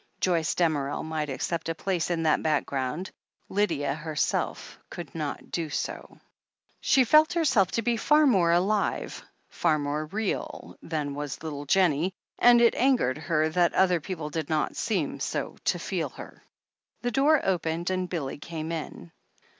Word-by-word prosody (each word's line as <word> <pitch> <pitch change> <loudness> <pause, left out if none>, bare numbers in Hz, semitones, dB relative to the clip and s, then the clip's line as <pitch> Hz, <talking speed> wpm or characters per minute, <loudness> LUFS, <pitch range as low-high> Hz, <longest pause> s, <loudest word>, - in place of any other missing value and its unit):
Joyce 170 -3 +1
Damerel 145 -5 0
might 155 -2 -3
accept 165 +5 -3
a 165 - -1
place 180 0 -1
in 170 -2 0
that 155 -1 +3
back 155 -2 +1
ground 140 +7 -3 0.2
— - - -44
Lydia 170 -9 0
herself 155 0 -2
could 175 - -8
not 150 -3 -5
do 165 -3 -2
so. - - -5 0.6
She 265 - +4
felt 305 +6 +5
herself 265 - +3
to 230 - 0
be 235 +1 +1
far 300 +6 +4
more 190 -11 +4
alive, 195 +4 0 0.3
far 160 -3 +1
more 150 +1 -2
real, 210 +4 -4
than 150 -3 -3
was 145 +1 -5
little 145 -2 -5
Jennie, 180 +1 +2 0.2
and 240 0 +7
it 235 - +5
angered 245 - +2
her 155 0 +1
that 175 +1 +2
other 180 -2 +4
people 160 -3 -5
did 160 -2 -3
not 155 -1 0
seem - - -1
so - - -3
to - - +2
feel - - -3
her. - - -12 0.6
The 245 - 0
door 285 +5 +4
opened, 170 -1 -1
and 185 -1 -1
Billy 145 -6 -4
came 160 0 -5
in. 150 - -6
165 Hz, 160 wpm, -27 LUFS, 155-190 Hz, 0.6 s, and